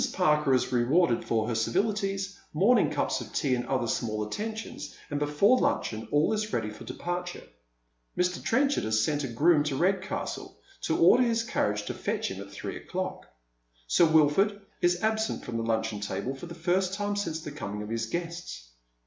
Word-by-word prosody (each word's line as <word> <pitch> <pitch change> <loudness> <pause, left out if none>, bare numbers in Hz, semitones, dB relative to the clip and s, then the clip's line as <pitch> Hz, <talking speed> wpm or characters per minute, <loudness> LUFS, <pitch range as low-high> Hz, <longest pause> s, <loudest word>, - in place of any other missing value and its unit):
Parker 150 -6 +3
is 130 - 0
rewarded 125 +2 +3
for 110 -1 0
her 120 - -1
civilitiea, 195 - 0 0.2
morning 220 +10 +4
cups - - -1
of - - -9
tea 140 -4 +1
and 120 -1 -1
other 130 -3 0
small 110 -2 -1
attentions, 220 - -5 0.2
and 145 - -1
before 150 +12 +3
luncheon 110 0 -1
all 150 +8 +3
is 215 0 -2
ready 110 -2 -1
for 105 - -11
departure. 175 0 -4 0.7
Mr. 180 0 0
Trenchard 275 +4 +2
has 110 0 +1
sent 145 +6 +1
a - - -1
groom 150 +7 +4
to 145 -2 -1
Redcastle 190 +5 -1 0.3
to 160 - +1
order 175 +9 +6
his 230 -2 +2
carriage 105 - 0
to - - -3
fetch - - -2
him 95 0 -6
at 100 - -9
three - - -6
o'clock. - - -5 0.6
Sir 170 - +4
Wilford 160 +6 +4 0.2
is 175 +1 +2
absent 220 0 0
from 120 -1 -3
the 115 - -1
luncheon 110 -2 -1
table 105 +5 -3
for 135 +5 -9
the 170 - -8
first 180 +3 +1
time 205 0 -1
since 165 -6 -2
the 150 - -7
coming 105 -8 -5
of 105 - -7
his 115 0 -2
guests. 170 - -5
155 Hz, 185 wpm, -28 LUFS, 115-195 Hz, 0.7 s, order